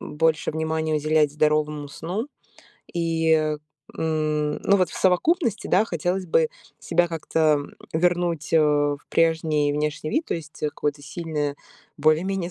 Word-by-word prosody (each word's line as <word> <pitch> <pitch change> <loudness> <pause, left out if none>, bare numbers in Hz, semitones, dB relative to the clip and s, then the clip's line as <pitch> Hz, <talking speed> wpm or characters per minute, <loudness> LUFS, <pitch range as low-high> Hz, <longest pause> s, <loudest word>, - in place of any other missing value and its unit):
больше 155 +1 0
внимания 160 0 -1
уделять 150 -1 +2
здоровому 150 -1 +1
сну. 185 - -4 0.6
И, 165 -1 0
э, 155 -1 +1 0.4
м, 155 -2 0
ну, 200 - +4
вот 185 -2 +1
в - - -9
совокупности, 225 - +2
да, 200 +4 +4
хотелось 180 0 -2
бы 485 -1 +3 0.3
себя 175 - +2
как-то, 165 -1 -4 0.2
м, 145 - -10 0.2
вернуть, 170 -2 0
э, 165 - +6
в 145 -1 +2
прежний 160 -3 +2
внешний 150 +1 -2
вид, 315 +2 0
то - - -1
есть, 155 -2 -9
э, 150 - +2
какое-то 145 0 -3
сильное, 150 -2 -3 0.4
более-менее 175 +3 +1
160 Hz, 145 wpm, -24 LUFS, 150-175 Hz, 0.6 s, э